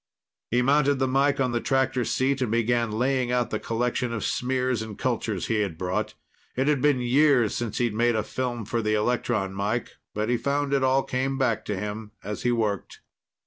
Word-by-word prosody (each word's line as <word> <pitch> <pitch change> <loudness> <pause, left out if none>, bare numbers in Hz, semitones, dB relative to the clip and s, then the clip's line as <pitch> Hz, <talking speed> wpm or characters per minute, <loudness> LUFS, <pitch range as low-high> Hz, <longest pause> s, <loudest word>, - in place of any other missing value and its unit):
He 125 +2 +2
mounted 145 +1 +3
the 130 0 0
mike 140 +2 +2
on 130 -2 +1
the 120 -1 -1
tractor 135 -2 +1
seat 135 +1 0
and 125 - 0
began 115 0 +1
laying 125 +2 0
out 125 -1 0
the - - -1
collection 120 +1 -1
of 115 -2 -3
smears 125 -2 0
and 110 -2 -7
cultures 115 -6 -1
he 110 -2 0
had 100 -6 -2
brought. 95 +5 -2 0.4
It 130 +2 0
had 150 -3 +2
been 145 -3 +3
years 125 -2 +3
since 120 -3 -3
he'd 120 -3 +1
made 120 +2 +2
a 110 - 0
film 120 -1 -3
for 115 +3 -1
the 110 0 +1
electron 110 -3 0
mike, 105 +5 -2 0.2
but 105 +1 -1
he 120 - +2
found 140 +2 -1
it 135 -1 +2
all 130 +1 +3
came 135 +1 -1
back 125 -5 0
to 105 - -2
him 105 +2 -5
as 105 +1 -5
he 120 - +1
worked. 110 -5 -2
120 Hz, 205 wpm, -26 LUFS, 110-130 Hz, 0.4 s, mounted